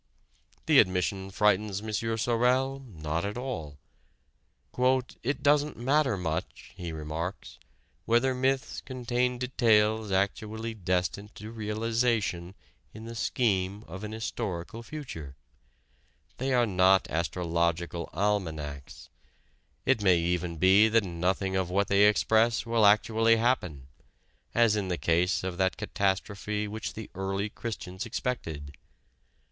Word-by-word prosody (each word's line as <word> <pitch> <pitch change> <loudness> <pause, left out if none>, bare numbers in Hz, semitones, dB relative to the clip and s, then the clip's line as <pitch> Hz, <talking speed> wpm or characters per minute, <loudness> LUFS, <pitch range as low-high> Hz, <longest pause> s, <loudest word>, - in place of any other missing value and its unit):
The 150 -4 +6
admission 95 0 +1
frightens 105 0 +1
M. 110 -1 -5
Sorel 120 +5 +1
not 80 - -4
at 105 +3 -3
all. 100 - -5 1.4
"It 140 +3 -2
doesn't 145 +1 +3
matter 135 -2 +2
much," 80 -3 -4
he 90 -2 -6
remarks, 80 +4 -5 0.5
"whether 120 +3 +3
myths 130 +1 -1
contain 125 -1 -1
details 110 -4 +2
actually 110 +4 -1
destined 95 +1 -2
to 105 +2 -8
realization 110 -4 -1 0.4
in 110 +1 -9
the 115 - -7
scheme 105 -3 0
of 95 +5 -8
an 105 - -5
historical 110 -1 -4
future; 115 - -8 1.0
they 135 +1 -1
are 125 -2 +4
not 95 -1 +4
astrological 85 +1 -1
almanacks; 80 -8 -3 0.8
it 130 -4 +3
may 95 -3 +5
even 85 0 -1
be 95 +6 +6
that 115 0 +3
nothing 95 +2 -1
of 95 -2 0
what 100 +2 +1
they 100 +1 +6
express 110 +2 +3
will 115 -2 +4
actually 110 +2 +4
happen 90 - 0 0.7
as 115 -2 +4
in 100 -3 -1
the 90 -1 -1
case 90 +5 +1
of 90 -1 -4
that 95 0 +1
catastrophe 100 0 -1
which 110 +2 -5
the 110 -2 -8
early 95 +2 -2
Christians 105 -2 -6
expected. 80 - -4
105 Hz, 120 wpm, -28 LUFS, 90-115 Hz, 1.4 s, The